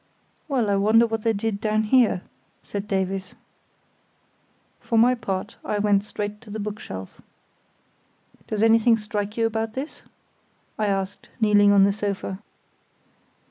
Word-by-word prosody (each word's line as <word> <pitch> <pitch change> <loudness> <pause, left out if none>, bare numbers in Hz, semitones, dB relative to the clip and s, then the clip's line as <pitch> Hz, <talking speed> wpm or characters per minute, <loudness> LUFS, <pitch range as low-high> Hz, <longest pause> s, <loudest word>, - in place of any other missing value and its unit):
"Well, 250 -8 +1
I 200 - +2
wonder 220 +4 +5
what 225 -1 -3
they 225 - +2
did 205 -1 -2
down 215 0 +1
here," 220 -4 +3 0.4
said 200 0 -5
Davies. 190 -1 -2 1.4
For 230 - -1
my 240 +3 +6
part 205 -5 -4
I 210 - -2
went 205 -1 +2
straight 210 0 -5
to 225 - -15
the 215 +1 -5
bookshelf. 200 - -7 1.3
"Does 215 0 -1
anything 225 +1 +5
strike 210 0 -4
you 230 - +2
about 225 0 -2
this?" 270 +5 -6 0.8
I 215 - +1
asked, 195 0 -3
kneeling 205 -2 +5
on 200 -1 +6
the 200 0 +3
sofa. 200 -2 -3
210 Hz, 140 wpm, -24 LUFS, 200-225 Hz, 1.4 s, my